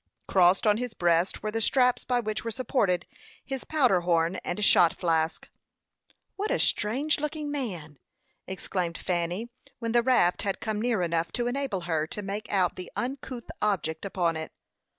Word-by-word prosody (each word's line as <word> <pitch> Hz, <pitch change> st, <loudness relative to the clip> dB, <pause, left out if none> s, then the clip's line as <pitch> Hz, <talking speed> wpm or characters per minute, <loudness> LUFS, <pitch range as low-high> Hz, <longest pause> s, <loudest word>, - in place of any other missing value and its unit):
Crossed 185 Hz, +1 st, +4 dB
on 210 Hz, -1 st, +4 dB
his 245 Hz, -1 st, -4 dB
breast 175 Hz, +2 st, +1 dB
were 215 Hz, -, -1 dB
the 225 Hz, +1 st, -2 dB
straps 250 Hz, +2 st, +3 dB
by 245 Hz, -1 st, +1 dB
which 215 Hz, -2 st, -3 dB
were 230 Hz, -, -3 dB
supported 220 Hz, -6 st, 0 dB, 0.4 s
his 270 Hz, -2 st, -4 dB
powder 255 Hz, -, +3 dB
horn 170 Hz, 0 st, +1 dB
and 210 Hz, -, -2 dB
shot 170 Hz, -4 st, +6 dB
flask. 165 Hz, -2 st, 0 dB, 0.9 s
"What 410 Hz, +2 st, -2 dB
a -, -, +2 dB
strange 270 Hz, +10 st, +1 dB
looking 300 Hz, 0 st, -3 dB
man!" 175 Hz, -, -5 dB, 0.5 s
exclaimed 180 Hz, -2 st, -3 dB
Fanny, 180 Hz, +6 st, -2 dB, 0.3 s
when 230 Hz, -1 st, -3 dB
the 240 Hz, +1 st, +4 dB
raft 235 Hz, -8 st, +3 dB
had 195 Hz, -1 st, -2 dB
come 215 Hz, -2 st, -2 dB
near 230 Hz, -6 st, +1 dB
enough 165 Hz, -1 st, 0 dB
to 240 Hz, -, -1 dB
enable 245 Hz, -6 st, -2 dB
her 160 Hz, -3 st, -1 dB
to 210 Hz, -, -6 dB
make 205 Hz, +3 st, -5 dB
out 185 Hz, -3 st, +1 dB
the 180 Hz, -1 st, -7 dB
uncouth 255 Hz, -1 st, -5 dB
object 160 Hz, -6 st, 0 dB
upon 180 Hz, -4 st, 0 dB
it. 160 Hz, -, -6 dB
205 Hz, 170 wpm, -27 LUFS, 175-245 Hz, 0.9 s, shot